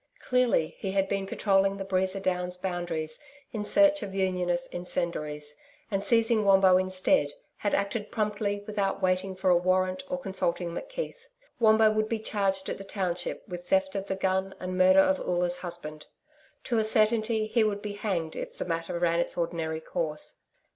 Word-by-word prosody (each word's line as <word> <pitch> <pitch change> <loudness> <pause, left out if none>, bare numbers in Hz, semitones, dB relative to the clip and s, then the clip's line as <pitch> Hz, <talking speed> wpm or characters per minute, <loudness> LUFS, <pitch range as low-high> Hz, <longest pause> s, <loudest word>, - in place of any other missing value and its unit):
Clearly, 250 -11 +2
he 190 -1 -3
had 195 -1 +2
been 195 0 -2
patrolling 195 -1 +2
the 195 - -5
Breeza 190 0 0
Downs 180 -1 -1
boundaries 175 -4 -3 0.3
in 215 -3 -3
search 300 +5 +5
of 195 -2 -6
Unionist 180 -2 0
incendiaries, 150 -4 -3 0.4
and 195 0 0
seizing 230 -1 +3
Wombo 195 -2 +6
instead, 185 -6 +1 0.2
had 205 - 0
acted 205 +2 -2
promptly 205 -1 -2
without 200 -2 -2
waiting 185 +1 +1
for 185 0 +2
a - - +6
warrant 185 +2 +1
or 270 - -1
consulting 175 -6 -2
McKeith. - - -6 0.3
Wombo 220 -1 +5
would 215 0 0
be 230 - 0
charged 195 -3 -1
at - - -4
the - - -7
township 180 -3 -3
with 175 0 -8
theft 190 0 +2
of 195 0 -4
the 190 - -1
gun 190 0 -1
and 185 0 -4
murder 185 +1 +6
of 190 0 +2
Oola's 175 0 0
husband. 170 -4 -6 0.6
To 235 -2 0
a - - +2
certainty 220 0 +3
he 220 +1 +2
would 205 -1 -1
be 210 -1 -4
hanged 185 -6 -2
if - - -6
the - - -3
matter 165 0 -3
ran 170 -1 +1
its 175 - -1
ordinary 165 -2 -2
course. 155 -1 -3
190 Hz, 175 wpm, -28 LUFS, 175-205 Hz, 0.6 s, Wombo